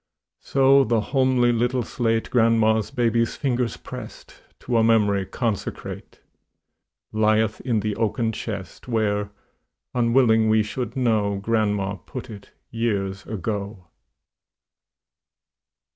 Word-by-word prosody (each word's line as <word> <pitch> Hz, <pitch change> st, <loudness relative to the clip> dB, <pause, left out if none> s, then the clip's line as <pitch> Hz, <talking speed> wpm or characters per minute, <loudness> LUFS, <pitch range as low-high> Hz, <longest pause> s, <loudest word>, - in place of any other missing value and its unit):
So 135 Hz, 0 st, +4 dB
the 115 Hz, -2 st, +1 dB
homely 130 Hz, +1 st, +2 dB
little 120 Hz, +2 st, 0 dB
slate 115 Hz, -2 st, -1 dB
Grandma's 110 Hz, -2 st, +3 dB
baby's 115 Hz, -1 st, +1 dB
fingers 125 Hz, -4 st, -1 dB
pressed, -, -, -10 dB, 0.2 s
To 120 Hz, -2 st, 0 dB
a 115 Hz, -, +4 dB
memory 105 Hz, -4 st, +3 dB
consecrate, 115 Hz, -5 st, -4 dB, 0.9 s
Lieth 110 Hz, 0 st, +1 dB
in 115 Hz, -4 st, 0 dB
the 105 Hz, 0 st, -2 dB
oaken 115 Hz, +1 st, 0 dB
chest, 100 Hz, -2 st, -7 dB
Where, 105 Hz, -3 st, 0 dB, 0.6 s
unwilling 115 Hz, -2 st, +3 dB
we 110 Hz, 0 st, +4 dB
should 115 Hz, +4 st, -5 dB
know, 110 Hz, -6 st, +1 dB
Grandma 105 Hz, -2 st, 0 dB
put 130 Hz, +4 st, -9 dB
it, 100 Hz, -2 st, -11 dB, 0.2 s
years 100 Hz, -4 st, -2 dB
ago. 100 Hz, -3 st, -5 dB
110 Hz, 105 wpm, -23 LUFS, 105-120 Hz, 0.9 s, So